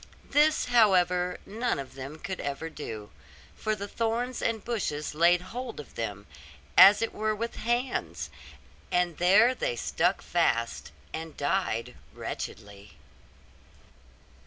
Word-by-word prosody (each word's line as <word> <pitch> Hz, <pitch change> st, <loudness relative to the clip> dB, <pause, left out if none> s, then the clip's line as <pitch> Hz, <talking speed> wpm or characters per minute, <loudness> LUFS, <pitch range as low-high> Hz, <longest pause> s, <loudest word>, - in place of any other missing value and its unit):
This, 300 Hz, +2 st, +4 dB
however, 180 Hz, -6 st, +3 dB
none 230 Hz, +1 st, -1 dB
of 140 Hz, -1 st, -7 dB
them 135 Hz, +3 st, -8 dB
could 190 Hz, +3 st, -5 dB
ever 145 Hz, +3 st, -4 dB
do; 110 Hz, -9 st, -7 dB, 0.4 s
for 215 Hz, 0 st, -1 dB
the 200 Hz, 0 st, -6 dB
thorns 235 Hz, +4 st, -2 dB
and 225 Hz, -2 st, -1 dB
bushes 165 Hz, -12 st, -2 dB
laid 170 Hz, +3 st, +4 dB
hold 245 Hz, -5 st, -5 dB
of 150 Hz, -, -10 dB
them, 105 Hz, -3 st, -4 dB, 0.5 s
as 205 Hz, +3 st, +9 dB
it 225 Hz, -, -2 dB
were 215 Hz, 0 st, -1 dB
with 230 Hz, +2 st, -4 dB
hands; 225 Hz, -, -2 dB, 0.6 s
and 180 Hz, -2 st, +1 dB
there 205 Hz, +8 st, +6 dB
they 120 Hz, -, -2 dB
stuck -, -, 0 dB
fast, 115 Hz, 0 st, 0 dB, 0.2 s
and 160 Hz, -1 st, -6 dB
died 140 Hz, -, -1 dB, 0.2 s
wretchedly. 100 Hz, -4 st, -7 dB
180 Hz, 125 wpm, -28 LUFS, 135-225 Hz, 0.6 s, as